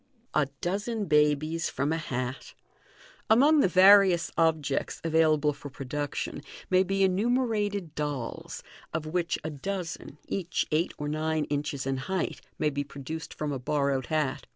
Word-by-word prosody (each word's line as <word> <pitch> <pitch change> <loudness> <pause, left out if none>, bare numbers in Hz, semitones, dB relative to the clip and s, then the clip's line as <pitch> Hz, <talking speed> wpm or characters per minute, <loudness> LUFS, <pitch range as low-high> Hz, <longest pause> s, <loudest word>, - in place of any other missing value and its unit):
A 150 -2 +2
Dozen 205 +4 -2
Babies 150 +1 +2
from 140 +4 -1
a - - 0
Hat. 130 -4 -4 0.4
— - - -25
Among 300 +4 +5
the 275 - +5
various 185 -2 +6
objects 155 -4 0
available 155 -2 +3
for 145 0 -9
production, 145 +1 -4 0.3
may 185 0 +5
be 195 +1 +1
enumerated 205 - +1
dolls, 145 -6 -4 0.3
of 160 -1 -2
which 170 +2 -1
a 155 - -3
dozen, 170 0 -5
each 180 -3 -1
eight 160 +3 +1
or 145 - -4
nine 155 +1 0
inches 145 -2 -2
in 135 0 -1
height, 185 +8 -3 0.2
may 150 - +1
be 145 0 -2
produced 140 +3 -7
from 150 -1 -3
a 135 - -3
borrowed 140 -1 0
hat. 150 -4 -1
155 Hz, 150 wpm, -28 LUFS, 145-185 Hz, 0.4 s, various